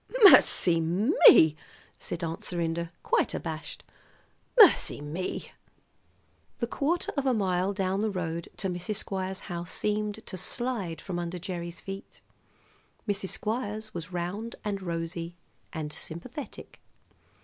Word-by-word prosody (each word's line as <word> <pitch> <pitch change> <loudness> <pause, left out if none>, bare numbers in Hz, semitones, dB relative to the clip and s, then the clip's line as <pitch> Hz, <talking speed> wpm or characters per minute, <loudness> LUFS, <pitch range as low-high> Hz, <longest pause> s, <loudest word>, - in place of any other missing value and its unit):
"Mercy 175 - +8
me!" 170 - +6 0.4
said 175 0 -5
Aunt 165 0 -4
Serinda, 170 -1 -2
quite - - +1
abashed. 155 -3 -5 0.7
"Mercy 425 -8 +7
me!" 150 +6 -4 1.1
The 235 - -1
quarter 300 +8 -1
of 280 -2 0
a 255 - +3
mile 190 -2 +1
down 190 -1 -1
the 215 +1 +1
road 170 -4 -3
to 195 - -2
Mrs. 180 +4 -3
Squires' 190 -2 -3
house 170 -3 -6
seemed 210 +1 -2
to 185 - -7
slide 210 -11 -2
from 180 -2 -4
under 175 +1 -4
Gerry's 175 -1 -6
feet. 195 0 -8 0.9
Mrs. 195 -2 -1
Squires 215 -1 -3
was 170 0 -6
round 185 +6 -4
and 200 -2 -2
rosy 170 -1 -4 0.3
and 155 -2 -5
sympathetic. 240 - -8
185 Hz, 125 wpm, -28 LUFS, 170-210 Hz, 1.1 s, Mercy